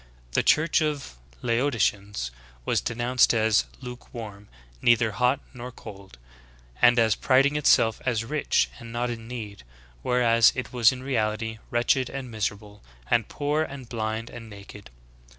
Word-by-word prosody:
*^ - - -25 0.3
The - - +2
church 155 +1 +3
of 150 - -2 0.3
the - - -10
Laodiceans 105 - 0 0.3
w^as - - 0
denounced 120 +1 +2
as 110 -1 +3 0.2
"lukewarm," 115 -5 -9 0.3
''neither 115 -2 +4
hot 125 +6 +1
nor 125 0 -8
cold," 100 - -12 0.6
and 120 0 +6
as 110 -2 +4
priding 135 +7 +3
itself 115 -6 +3
as 115 -3 -1
rich 115 - 0
and 115 -1 -10
not 120 +1 -2
in 115 -1 -7
need, 110 -4 -7 0.4
whereas 115 - +4
it 130 - -5
was 120 -1 +5
in 130 0 -7
reality 110 -3 -2
"wretched, 120 +2 +1
and 135 -3 -6
miserable, 105 -1 -4 0.3
and 115 -3 +3
poor, 150 +1 -1
and 135 -5 -6
blind, 110 0 -3
and 115 -1 -10
naked."' 100 0 -12
115 Hz, 150 wpm, -26 LUFS, 110-125 Hz, 0.6 s, and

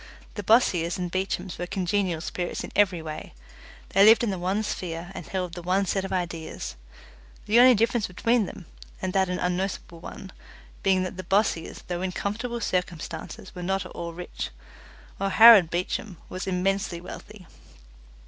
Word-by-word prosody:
The 205 - -4
Bossiers 180 -6 +3
and 180 -1 -3
Beechams 185 -1 -3
were 175 - -3
congenial 185 -3 -1
spirits 175 +1 -4
in - - -7
every 185 -5 +3
way 155 -1 -7 0.5
they 195 - +5
lived 225 +3 +7
in 225 - +1
the 190 - -3
one 190 +4 0
sphere 175 -3 -4
and 175 -6 -8
held 180 -1 -3
the 175 - -6
one 185 +3 +1
set 195 +1 0
of 195 - -5
ideas, 175 - -4 0.7
the 225 +3 +4
only 250 0 +8
difference 230 0 +1
between 225 +4 +1
them, 190 - -9 0.3
and 185 -1 -3
that 190 -1 +2
an 180 - -1
unnoticeable 180 -1 -2
one, 190 +2 -9 0.5
being 190 -1 +3
that 185 0 -5
the 185 - -5
Bossiers, 190 -3 0
though 175 -1 -3
in 185 -1 -2
comfortable 230 +5 -3
circumstances, 180 0 -4
were 180 - -7
not 190 +1 -1
at - - -9
all 170 0 -5
rich, 175 +1 -6 0.7
while 195 0 -1
Harold 220 -4 +9
Beecham 180 +2 -3
was 185 +1 -5
immensely 190 -1 0
wealthy. 185 +2 -10
185 Hz, 170 wpm, -26 LUFS, 175-200 Hz, 0.7 s, Harold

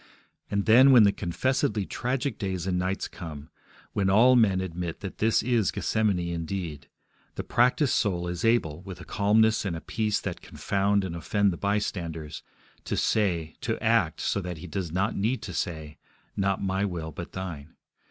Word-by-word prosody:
And, 100 -1 -1
then, 130 +5 +7
when 120 -4 +8
the 100 - +5
confessedly 105 +2 -1
tragic 125 +3 -2
days 95 -3 -3
and 90 -1 0
nights 95 +2 -2
come, 80 -6 -9 0.4
when 100 -2 +1
all 120 +6 +6
men 105 -6 +4
admit 90 -2 -4
that 95 - -7
this 110 0 +2
is 115 -4 +2
Gethsemane 110 -4 0 0.2
indeed, 85 -4 -5 0.5
the - - -4
practised 125 +3 +2
soul 90 -4 0
is 85 0 -4
able, 100 -9 +1
with 90 -2 -9
a 90 - -10
calmness 110 +4 +3
and 95 -5 -2
a - - -4
peace 105 +3 -1
that - - -5
confound 100 0 0
and 90 -3 -4
offend 100 +3 +1
the - - -4
bystanders, 85 -6 -3 0.4
to - - -2
say, 85 -7 0
to - - -1
act - - +1
so 100 - 0
that 90 -2 -5
he 85 - -9
does 90 -1 -4
not 100 +6 0
need 110 +4 -1
to 90 - -6
say, 80 -3 -4 0.4
Not 100 0 0
my 95 0 0
will, 85 -5 -3
but 85 +3 -8
Thine. 85 -5 -7
95 Hz, 175 wpm, -27 LUFS, 85-105 Hz, 0.5 s, when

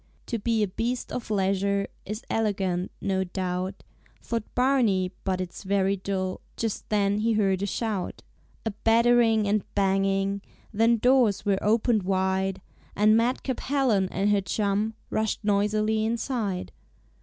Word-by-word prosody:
"To 230 - -3
be 225 0 +1
a - - +1
beast 235 +6 -3
of 245 - -5
leisure 200 0 +1 0.2
Is 210 +3 -5
elegant, 195 -5 -1
no 190 -1 0
doubt," 185 +1 -3 0.4
Thought 230 -2 -4
Barney, 235 -8 +2
"but 190 -1 -1
it's 185 -1 -5
very 195 0 +1
dull." 190 -1 -3 0.2
Just 225 -2 -3
then 205 -1 +2
he 225 +1 +2
heard 195 -3 +1
a 200 - -1
shout, 210 -3 -3 0.4
A 220 - 0
battering 230 -1 +4
and 210 +1 +2
banging, 195 0 +1 0.3
Then 225 +2 +3
doors 245 -4 +3
were 195 -1 +2
opened 220 +1 +2
wide, 190 0 0 0.3
And 215 +1 +5
madcap 245 +2 0
Helen 250 -9 +1
and 200 +2 +1
her 205 -1 +3
chum 210 +2 -1 0.2
Rushed 220 0 -1
noisily 215 +1 +1
inside. 225 -4 -2
205 Hz, 140 wpm, -26 LUFS, 195-225 Hz, 0.4 s, And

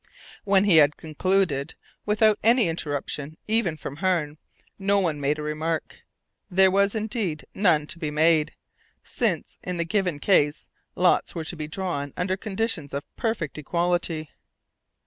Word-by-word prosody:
When 195 -1 +4
he 195 -5 +5
had 150 -1 +5
concluded 160 -2 0 0.3
without 210 0 +3
any 235 0 +4
interruption 150 -1 -4
even 215 -7 +1
from 140 -1 -7
Hearne 160 -4 0 0.4
no 200 +1 +2
one 160 -6 -1
made 145 +2 +1
a 150 - -5
remark. 155 +1 -3 0.5
There 190 +1 +5
was, 200 +2 +2
indeed, 210 -7 -2
none 165 -7 +3
to 170 - -7
be 155 -3 -2
made, 155 +1 +2 0.5
since, - - -2
in 180 -1 -4
the 170 - -1
given 180 -3 0
case, 145 -2 +2 0.3
lots 180 +1 +2
were 165 - -3
to 175 - -4
be 155 -2 -5
drawn 155 -5 -4
under 185 +1 0
conditions 195 -8 -3
of 140 - -3
perfect 190 - -2
equality. 170 -1 -1
170 Hz, 145 wpm, -25 LUFS, 150-195 Hz, 0.5 s, he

